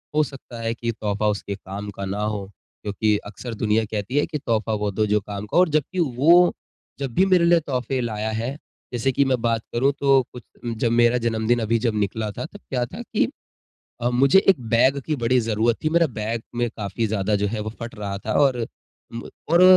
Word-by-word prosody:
हो 155 - +5
सकता 135 -4 -9
है 115 0 -1
की 115 0 -3
तोहफ़ा 105 -1 -1
उसके 100 -1 -3
काम 100 +1 -7
का 100 0 -6
ना 100 +2 -3
हो। 105 -2 -2 0.4
क्योंकि 105 +1 +1
अक्सर 115 +3 -7
दुनिया 110 +1 +1
कहती 110 +5 -3
है - - +3
कि 150 - -3
तोहफ़ा 110 -4 -1
वो 105 -1 -1
दो 110 +2 +1
जो 105 +1 +3
काम 100 +1 -6
का - - -1
और 180 -2 +5
जबकि 155 +4 0 0.2
वो 175 +5 +6 0.5
जब 135 -4 -3
भी 190 - +5
मेरे 180 -3 +4
लिए 170 0 +5
तोहफ़े 130 -3 -2
लाया 110 -2 -2
है 120 +6 -3 0.4
जैसे 120 +3 +1
कि 140 +2 +3
मैं 130 -2 +1
बात 115 -1 +1
करूँ 135 +4 +3
तो 135 -1 +5
कुछ 125 - -9 0.4
जब 115 - +3
मेरा 120 +1 +4
जन्मदिन 115 +1 +1
अभी 115 +1 +1
जब 110 -2 +1
निकला 105 +2 -1
था 155 - -5
तब 205 +5 -11
क्या 125 -2 0
था - - -8
कि - - 0 0.7
अ, 120 - +2
मुझे 135 +9 +5
एक 175 -9 +5
बैग 135 +4 +4
की 155 - 0
बड़ी 125 0 +2
ज़रूरत 115 +1 +1
थी। 155 - +2
मेरा 165 0 +3
बैग 110 +1 -2
में 120 -1 0
काफ़ी 105 +2 -2
ज़्यादा 105 0 0
जो 100 0 +1
है 110 +1 -3
वो 110 - -4
फट 115 0 -6
रहा 100 -1 -3
था - - -1
और 125 -5 +3 0.5
म 115 - -6 0.2
और 175 +2 +6
115 Hz, 220 wpm, -23 LUFS, 105-135 Hz, 0.7 s, वो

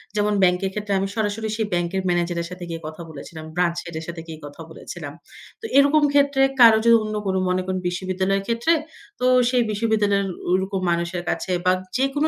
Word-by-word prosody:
যেমন 210 0 +1
ব্যাংকের 180 +1 +2
ক্ষেত্রে 210 -1 -3
আমি 195 - -1
সরাসরি 220 0 -1
সেই 220 -2 -1
ব্যাংকের 175 +2 0
ম্যানেজারের 175 -1 0
সাথে 180 0 -8
গিয়ে 165 -1 -5
কথা 155 +2 -8
বলেছিলাম, 155 +1 -9
ব্রাঞ্চ 175 -1 +1
হেড 170 -1 -8
এর - - -8
সাথে 170 -1 -6
গিয়ে 160 -1 -8
কথা 145 +3 -10
বলেছিলাম। 160 -2 -8 0.5
তো - - -7
এরকম 285 +2 +5
ক্ষেত্রে 280 -1 +3 0.2
কারো 230 -2 +8
যো - - +5
অন্য 215 0 -4
কোনো 190 0 +1
মনে 185 0 +1
করেন 185 0 -2
বিশ্ববিদ্যালয়ের 190 +2 -1
ক্ষেত্রে, 235 +8 +2 0.5
তো 250 - 0 0.2
সেই 250 -1 +2
বিশ্ববিদ্যালয়ের 205 -2 +1 0.2
ঐরকম 190 +1 0
মানুষের 170 +1 -1
কাছে - - -2
বা 185 - +5 0.3
যেকোনো 275 +4 +1
190 Hz, 185 wpm, -22 LUFS, 175-220 Hz, 0.5 s, কারো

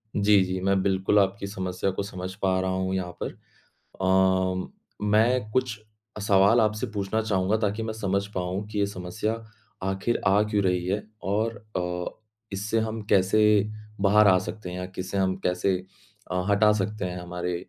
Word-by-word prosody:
जी, 100 -1 +5
जी, 95 0 -2
मैं 95 0 +2
बिल्कुल 95 +1 +2
आपकी 100 0 0
समस्या 95 -1 -2
को 95 +2 -3
समझ 95 -2 -6
पा 95 -1 +2
रहा 95 0 -1
हूँ 95 0 -1
यहाँ 90 -2 -2
पर। - - -3 0.7
अ, 95 0 +2 0.3
मैं 110 +2 +3
कुछ 125 -3 0 0.4
सवाल 100 +3 +5
आपसे 110 +2 +1
पूछना 100 +2 -1
चाहूँगा 100 -1 +1
ताकि 105 0 -1
मैं 110 0 -3
समझ 100 -2 -1
पाऊँ 95 +2 -2
कि 105 -1 -4
ये 100 - +3
समस्या 100 +3 -3 0.5
आखिर 95 +5 -1
आ 100 +2 +5
क्यों 105 -1 0
रही 90 -1 +1
है 100 +3 0 0.3
और 110 +3 0 0.2
अ, 90 0 -3 0.3
इससे 105 +3 -1
हम 110 0 -3
कैसे 100 +2 +4 0.6
बाहर 105 +1 +5
आ 95 -1 +6
सकते 95 0 -6
हैं 90 - -6
या - - -3
इसे 95 +2 -3
हम 95 -1 +1
कैसे 90 +1 +1 0.5
अ, 90 0 0
हटा 105 +1 +5
सकते 105 +1 -2
हैं 90 0 -4
हमारे 90 0 -4
95 Hz, 170 wpm, -26 LUFS, 95-105 Hz, 0.7 s, आ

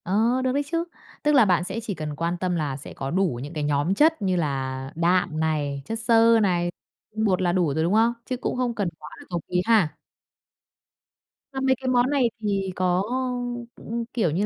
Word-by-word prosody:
Ờ, 225 +7 +2
được 260 - +1
đấy 285 +2 0
chứ. 335 0 +1 0.4
Tức 300 - +3
là 250 -5 +7
bạn 180 -3 +2
sẽ 190 +5 -3
chỉ 215 - -3
cần 155 -3 -5
quan 170 +3 -1
tâm 180 0 -1
là 145 -5 -2
sẽ 140 - -9
có 135 0 -5
đủ 180 -9 +1
những 145 +3 -7
cái 150 -2 -3
nhóm 145 +4 +1
chất 320 +4 +3
như 190 -2 +1
là 135 -4 -2
đạm 170 -1 +1
này, 150 -3 -1
chất 225 0 -3
xơ 230 0 +5
này, 175 -3 +1 0.4
tinh 220 0 0
bột 185 -3 +2
là 175 -1 +2
đủ 175 -5 +1
rồi, 160 +2 0
đúng 175 +4 +1
không? 225 +2 +4
Chứ 255 - -3
cũng 250 - -3
không 245 -2 -1
cần 205 -5 -1
quá 150 - -10
là - - -12
cầu 175 -2 -2
ký 180 0 +1
ha. 215 -9 +3 1.6
Mà 265 - -3
mấy 265 0 +3
cái 260 - -4
món 250 0 +3
này 275 -4 +2
thì 195 -3 -1
có, 185 0 +1 0.7
ưm, 230 +1 -4
kiểu 200 -10 +1
như 185 +7 0
185 Hz, 220 wpm, -24 LUFS, 160-230 Hz, 1.6 s, là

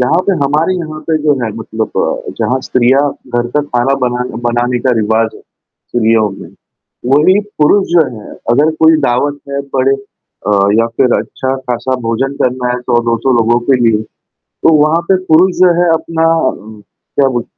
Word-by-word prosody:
यहाँ 140 +7 +2
पे 200 - +3
हमारी 155 +6 +1
यहाँ 155 -2 -6
पे 160 - +2
जो 150 -1 +3
है 110 - -2
मतलब 110 0 -4 0.5
जहाँ 130 +1 0
स्त्रियाँ 130 +2 +2 0.4
घर 120 0 0
का - - +4
खाना 135 -1 0
बना 125 0 -1 0.2
बनाने 120 +1 0
का 130 - +4
रिवाज़ 110 +1 0
है, - - -15 0.5
स्त्रियों 110 -2 +2
में। 95 - -10 0.6
वही 180 +8 +4 0.2
पुरुष 195 +6 +3
जो 170 -2 +5
हैं, 105 - -11 0.2
अगर 145 +6 +3
कोई 160 0 +6
दावत 145 +4 0
है 140 0 -2
पड़े 135 +1 +2
अ, 135 -5 -8 0.3
या 115 - +1
फिर 125 - +2
अच्छा-खासा 130 -1 -3
भोजन 135 +5 -1
करना 125 0 -1
है 125 - -3
100-200 120 +1 0
लोगों 120 +1 +2
के 130 -2 +3
लिए, 110 -2 +2 0.6
तो 160 - +5
वहाँ 160 +3 +2
पे 190 - +5 0.2
पुरुष 180 +3 +4
जो 180 -2 +5
है 175 - +2
अपना 165 0 -1 0.2
उम, 110 0 -10
क्या 135 +6 -3
बोल 120 - -2
130 Hz, 170 wpm, -13 LUFS, 120-155 Hz, 0.6 s, कोई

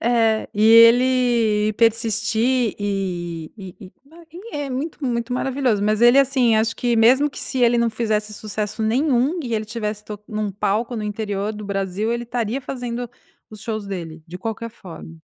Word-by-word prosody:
É 225 -2 +1
e 210 - 0
ele 230 -2 +5
persistir 230 +1 +1
e 175 -5 -3
e 190 -3 -10
e, - - -17 0.2
ah, 340 0 -15
ele 370 +2 -9
é 290 -1 -3
muito, 290 +4 -5
muito 235 -1 -2
maravilhoso, 255 -4 0
mas 215 +1 +1
ele, 240 +3 +7
assim, 255 -4 +3
acho 225 +1 +1
que 240 -1 0
mesmo 260 +6 +4
que - - -10
se 260 - -2
ele 240 0 +4
não 235 - +2
fizesse 215 -2 -1
sucesso 215 +1 -4
nenhum 260 +6 +1
e 240 -4 -3
ele 215 0 -1
tivesse 210 -1 -5
to 210 -1 -7
num 215 -2 -2
palco 210 +4 -1
no 215 - -3
interior 210 0 -3
do 210 0 -8
Brasil 200 +2 -2
ele 235 0 -3
estaria 235 +1 -2
fazendo 245 -2 -5 0.4
os 215 -1 -11
shows 215 -3 -4
dele 165 -4 -6
de 180 +2 -8
qualquer 225 +3 -5
forma. 170 -5 -11
225 Hz, 175 wpm, -21 LUFS, 210-245 Hz, 0.4 s, ele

